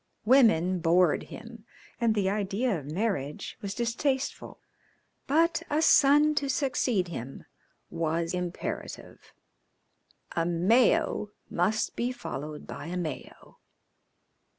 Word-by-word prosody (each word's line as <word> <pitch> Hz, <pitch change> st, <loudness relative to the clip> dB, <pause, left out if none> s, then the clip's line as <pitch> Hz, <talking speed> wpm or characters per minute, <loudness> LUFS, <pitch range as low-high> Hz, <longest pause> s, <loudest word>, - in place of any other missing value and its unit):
Women 215 Hz, -8 st, +4 dB
bored 170 Hz, 0 st, +3 dB
him, 230 Hz, -1 st, -10 dB, 0.4 s
and 230 Hz, -2 st, +2 dB
the 200 Hz, -3 st, +1 dB
idea 200 Hz, +1 st, 0 dB
of 140 Hz, -, -11 dB
marriage 165 Hz, -5 st, -3 dB
was 200 Hz, 0 st, -5 dB
distasteful, 260 Hz, +3 st, -2 dB, 0.7 s
but 330 Hz, +4 st, +2 dB
a 300 Hz, -, +1 dB
son 295 Hz, +1 st, +5 dB
to 280 Hz, -, -3 dB
succeed 250 Hz, -, 0 dB
him 135 Hz, -5 st, -7 dB, 0.5 s
was 165 Hz, +1 st, -1 dB
imperative 180 Hz, -1 st, -6 dB, 1.0 s
a 165 Hz, -, +1 dB
Mayo 195 Hz, +5 st, +2 dB, 0.2 s
must 210 Hz, +6 st, 0 dB
be 245 Hz, +1 st, -1 dB
followed 150 Hz, -, -7 dB
by -, -, -8 dB
a 180 Hz, +2 st, -4 dB
Mayo. 160 Hz, -6 st, -7 dB
200 Hz, 105 wpm, -28 LUFS, 170-245 Hz, 1.0 s, son